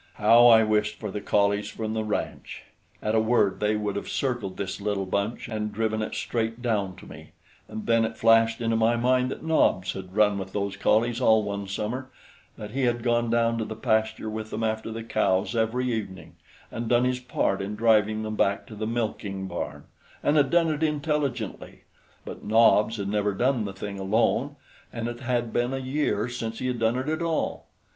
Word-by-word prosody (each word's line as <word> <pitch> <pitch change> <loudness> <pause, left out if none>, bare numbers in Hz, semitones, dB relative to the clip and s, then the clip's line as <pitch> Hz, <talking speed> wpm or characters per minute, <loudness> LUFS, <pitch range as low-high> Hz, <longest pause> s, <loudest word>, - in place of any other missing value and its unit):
How 115 +3 +6
I 115 -2 +7
wished 105 -1 0
for 105 -3 -5
the 105 - -4
collies 100 0 +1
from 110 -1 -4
the 110 -1 -1
ranch! 105 -1 -4 0.4
At 110 - 0
a 110 - +4
word 110 -3 +2
they 105 0 +1
would 105 -2 -2
have 100 - -4
circled 120 -8 -2
this 100 0 -4
little 100 -1 -1
bunch 100 +4 -2
and 105 -2 -3
driven 110 +1 -1
it 110 - -4
straight 115 0 -2
down 105 -6 -1
to - - -14
me; - - -12 0.3
and 110 - -7
then 115 -1 +3
it 110 0 -3
flashed 115 0 +4
into 115 -1 +1
my 115 +1 +3
mind 125 +2 +2
that - - -6
Nobs 100 - +2
had 95 0 -9
run 105 -2 +3
with 95 0 -7
those 100 -1 -2
collies 115 +4 +1
all 110 -3 +4
one 100 -1 -4
summer, 115 +7 -4 0.5
that 105 -1 -7
he 130 +2 0
had 120 -1 0
gone 120 -1 +1
down 115 0 +2
to - - 0
the 110 0 -6
pasture 110 0 0
with 110 0 -5
them 110 +1 -4
after 110 0 -2
the 115 0 -5
cows 95 -1 0
every 120 +2 0
evening 105 -4 -6 0.4
and 115 -1 -4
done 120 0 +4
his 125 0 0
part 125 -6 -1
in 100 +2 -4
driving 110 -1 +3
them 110 0 -4
back 100 -1 +1
to 110 - -11
the 110 +1 -3
milking 105 -4 -3
barn, 85 -2 -5 0.4
and 145 - +2
had 145 -3 +4
done 170 0 +3
it 150 0 -3
intelligently; 145 -7 -2 0.4
but - - -8
Nobs 110 0 +4
had 100 -1 -3
never 105 0 0
done 125 0 +1
the 100 - -4
thing 100 0 -6
alone, 115 +8 +1 0.4
and 115 -1 -4
it 120 0 -5
had 120 -2 -1
been 120 +2 0
a - - -2
year 135 +2 -1
since 115 -2 -5
he - - -4
had 125 -2 -1
done 115 +2 +1
it 130 +2 -3
at 155 +2 -1
all. 165 -1 -2
110 Hz, 205 wpm, -26 LUFS, 105-120 Hz, 0.5 s, I